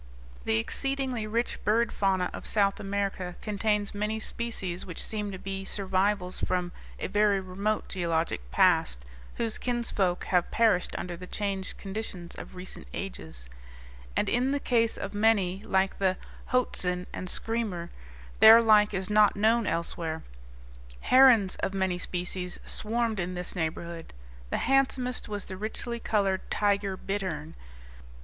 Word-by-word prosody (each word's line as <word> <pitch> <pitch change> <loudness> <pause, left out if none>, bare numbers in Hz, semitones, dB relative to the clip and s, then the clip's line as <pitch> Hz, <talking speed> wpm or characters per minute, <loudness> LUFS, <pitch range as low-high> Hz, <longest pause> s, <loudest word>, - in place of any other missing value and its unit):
The 110 - +3
exceedingly 260 - -1
rich 230 +3 -1
bird 225 +2 +2
fauna 190 -2 +1
of - - -7
South 200 -2 +2
America 195 -3 -2
contains 210 -1 -1
many 210 +2 -1
species 215 -6 -3
which 180 - -6
seem 210 -2 -3
to 190 - -6
be 195 +1 -5
survivals 195 -1 0
from 180 -1 -1 0.3
a - - -4
very 205 0 +3
remote 195 +3 -2
geologic 165 - -1
past, - - +3 0.3
whose 230 -2 -1
kinsfolk 230 -7 0
have 180 -2 +1
perished 215 -6 +2
under 180 -1 -4
the 180 +1 -9
changed 195 -2 -3
conditions 195 -4 -6
of - - -9
recent 180 +1 -7
ages; 80 - -6 0.7
and - - +1
in 250 +3 +2
the 285 +1 +1
case 230 -4 +1
of - - -5
many, 205 -3 +2
like 190 -2 +1
the 190 -1 +2 0.3
hoatzin 180 -8 +1
and 185 - -5
screamer, 215 -8 -2 0.5
their 225 +1 +10
like 210 -2 +5
is 190 -1 -2
not 210 0 +5
known 220 +2 +3
elsewhere. 165 -1 -2 0.8
Herons 250 -7 +6
of 195 - -2
many 190 -2 0
species 180 0 -3
swarmed 225 -1 -1
in 180 0 -2
this 180 +1 -4
neighborhood. 165 0 -4 0.4
The - - 0
handsomest 260 -3 +1
was 205 -2 -2
the 190 - -7
richly 230 +3 -4
colored 200 -4 +1
tiger 200 -2 +1
bittern. 185 -6 -3
195 Hz, 140 wpm, -28 LUFS, 180-220 Hz, 0.8 s, their